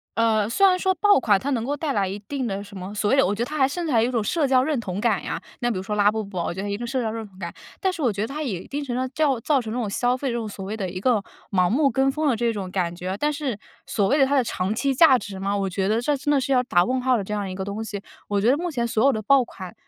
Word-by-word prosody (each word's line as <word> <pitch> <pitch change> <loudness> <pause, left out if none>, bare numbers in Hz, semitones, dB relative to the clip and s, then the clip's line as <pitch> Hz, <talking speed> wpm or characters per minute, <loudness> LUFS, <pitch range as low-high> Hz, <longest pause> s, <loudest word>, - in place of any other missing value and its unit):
呃， 220 -2 +2
虽 390 +10 +4
然 365 -1 +3
说 375 0 +1
爆 410 +4 +5
款 210 -6 +3
它 280 - -3
能 235 -4 0
够 285 +4 -2
带 290 -1 -2
来 200 -2 +1
一 195 +2 -4
定 275 -3 -2
的 200 -2 -3
什 200 -1 -10
么 185 +2 -7
所 210 0 0
谓 270 - +3
有 270 - +5
我 200 - +1
觉 215 - -4
得 235 - +1
它 305 +3 -5
还 265 - +5
甚 335 +6 -3
至 - - -1
还 225 - +4
有 240 - +1
一 - - -3
种 230 -3 +1
社 290 - 0
交 260 -1 +4
认 295 +1 0
同 195 -2 -4
感 215 -4 +1
呀， 170 - -4 0.2
那 240 0 +1
比 200 - -2
如 - - -2
说 210 +1 -3
拉 205 0 +4
布 220 0 -2
布 195 -2 -9
我 170 - -1
觉 190 - -5
得 205 - -4
一 200 - -1
个 240 +3 -5
社 260 +1 -1
交 225 - -1
认 225 0 -5
同 190 -2 -17
感， 170 -2 -5 0.3
但 380 - +1
是 335 - -6
我 245 -6 +2
觉 200 +1 -4
得 220 - -1
它 300 +4 -4
也 195 - -3
一 - - -16
定 290 +1 -4
程 255 - -4
度 250 - -1
上 260 0 -1
造 290 -5 +2
造 275 +2 +1
成 220 -2 -6
这 245 - -2
种 225 -4 -2
消 245 +5 +1
费 275 - -3
这 245 - -1
种 230 -2 -2
所 195 -1 -7
谓 205 +3 -4
的 195 -4 -3
一 185 +1 -5
个 220 -2 +2 0.3
盲 180 -3 +3
目 275 - +3
跟 270 0 +2
风 310 +2 -1
的 255 - +3
这 235 +1 +1
种 200 -4 -5
感 180 -2 -1
觉。 180 +2 -4
但 295 +7 +1
是 280 -7 -3 0.3
所 200 -1 0
谓 285 - +3
的 275 - +5
它 280 +2 +1
的 265 - +4
长 200 -2 -2
期 270 +4 +1
价 265 -1 +6
值 200 -5 -7
嘛， 200 +1 -1
我 195 -1 -1
觉 190 +1 -1
得 220 +2 +1
这 290 +3 +1
真 285 +2 -4
的 275 - +3
是 265 - -2
要 255 -2 +4
打 175 -8 +3
问 255 +6 0
号 255 0 +3
的 210 - -1
这 210 - -5
样 200 -2 -2
一 185 - -5
个 190 - -4
东 200 +3 -4
西。 210 -3 -6 0.2
我 205 -1 0
觉 230 +5 +4
得 280 - +2
目 350 +1 -2
前 240 -7 -1
所 225 +1 +1
有 275 - +5
的 215 - -2
爆 270 +5 +4
款， 185 -5 -9
230 Hz, 385 characters per minute, -24 LUFS, 200-270 Hz, 0.3 s, 价